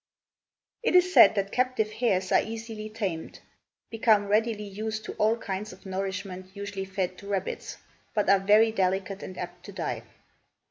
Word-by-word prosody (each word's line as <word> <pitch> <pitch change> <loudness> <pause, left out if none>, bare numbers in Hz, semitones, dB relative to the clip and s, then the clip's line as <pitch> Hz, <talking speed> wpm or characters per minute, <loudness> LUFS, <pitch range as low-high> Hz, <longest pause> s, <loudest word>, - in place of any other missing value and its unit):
It 455 - +1
is 360 0 +5
said - - +8
that 200 -1 -1
captive 255 -4 +1
hares 205 -5 0
are - - +5
easily 220 -1 -6
tamed, 195 -7 -4 0.5
become 220 -2 +3
readily 215 0 +1
used 215 +2 -4
to - - -5
all 220 +2 +3
kinds 205 -1 -4
of 190 - -17
nourishment 190 -1 -4
usually 200 -1 -5
fed 190 -1 -3
to 200 - -11
rabbits, 195 -2 -3 0.4
but 210 - +1
are 195 0 +6
very 210 +3 +5
delicate 195 -1 -1
and 185 - -8
apt - - -7
to - - -8
die. - - -3
205 Hz, 165 wpm, -27 LUFS, 190-220 Hz, 0.5 s, said